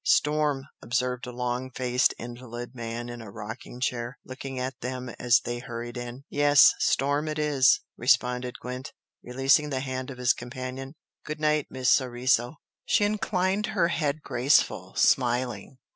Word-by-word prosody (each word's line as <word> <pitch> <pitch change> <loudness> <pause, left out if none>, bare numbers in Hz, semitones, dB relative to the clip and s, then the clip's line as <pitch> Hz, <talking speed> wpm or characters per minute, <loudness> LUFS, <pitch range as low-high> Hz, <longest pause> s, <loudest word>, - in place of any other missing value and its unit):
"Storm!" 150 -2 +2 0.2
observed 125 +1 -1
a - - -5
long 125 +1 -2
faced 125 -1 +1
invalid 120 0 -8
man 120 -1 -5
in 120 -1 -7
a 110 - -9
rocking 115 +4 -8
chair, 125 0 -2
looking 135 0 -7
at 130 0 -4
them 125 0 -4
as 125 0 +4
they 120 0 -4
hurried 120 0 -6
in. 120 +2 -6
"Yes! 145 -1 +6
Storm 145 +3 +1
it 155 0 -3
is!" 150 - +4 0.2
responded 125 0 +2
Gwent, 125 +1 -6 0.3
releasing 135 +4 +2
the 130 -2 -2
hand 130 -1 -4
of 130 - -8
his 125 0 +3
companion 130 +3 -7 0.3
"Good 155 0 -5
night, 150 -1 +1
Miss 130 -1 +1
Soriso!" 125 0 +2 0.3
She 210 - +2
inclined 200 -1 0
her 170 -2 +4
head 155 -3 -1
graceful, 130 +4 +2
smiling. 125 -2 +1
130 Hz, 150 wpm, -27 LUFS, 120-140 Hz, 0.3 s, Yes